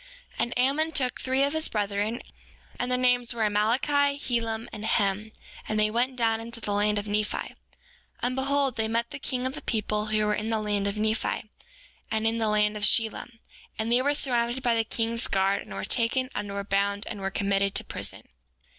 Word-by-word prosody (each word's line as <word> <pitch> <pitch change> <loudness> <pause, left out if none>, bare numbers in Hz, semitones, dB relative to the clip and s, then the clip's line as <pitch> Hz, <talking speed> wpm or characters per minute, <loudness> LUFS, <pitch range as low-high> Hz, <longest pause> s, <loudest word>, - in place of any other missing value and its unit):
7:6 - - -23
And 240 - 0
Ammon 280 +6 +2
took 255 -4 -1
three 260 +1 +2
of 285 +1 +1
his 315 0 0
brethren, 205 +2 -1 0.6
and 245 - 0
their 250 - +3
names 245 -1 +2
were 225 - 0
Amaleki, 265 +7 +2
Helem, 230 -3 -2
and 210 - -6
Hem, 210 0 +1 0.4
and 215 0 +1
they 215 0 +3
went 250 +3 +1
down 225 -2 +1
into 230 +1 -5
the 205 -2 -2
land 210 +1 +2
of 205 - -2
Nephi. 210 0 0
7:7 - - -17 0.7
And 250 +1 +1
behold, 275 -1 +1
they 220 0 +1
met 230 +1 -1
the - - -5
king 255 -2 -3
of 260 - -1
the - - -7
people 215 -1 -1
who 215 0 +1
were 210 - +2
in 215 +1 -2
the 225 - +1
land 205 -1 0
of 200 +1 -2
Nephi, 215 0 -1 0.6
and 220 0 0
in 225 +1 +1
the 220 - +1
land 210 0 +2
of 210 - -5
Shilom; 225 +2 +1 0.4
and 220 +1 -1
they 245 +1 +4
were 285 +2 +2
surrounded 245 -2 +1
by 240 -1 +3
the 225 -1 +2
king's 230 +1 -1
guard, 195 +1 +2
and - - -12
were 100 0 -4
taken, 255 +3 +1
and 205 -1 -3
were 200 0 -3
bound, 200 +1 0
and 200 - -6
were 195 - -1
committed 195 0 0
to - - +2
prison. - - -4
225 Hz, 215 wpm, -27 LUFS, 210-250 Hz, 0.7 s, they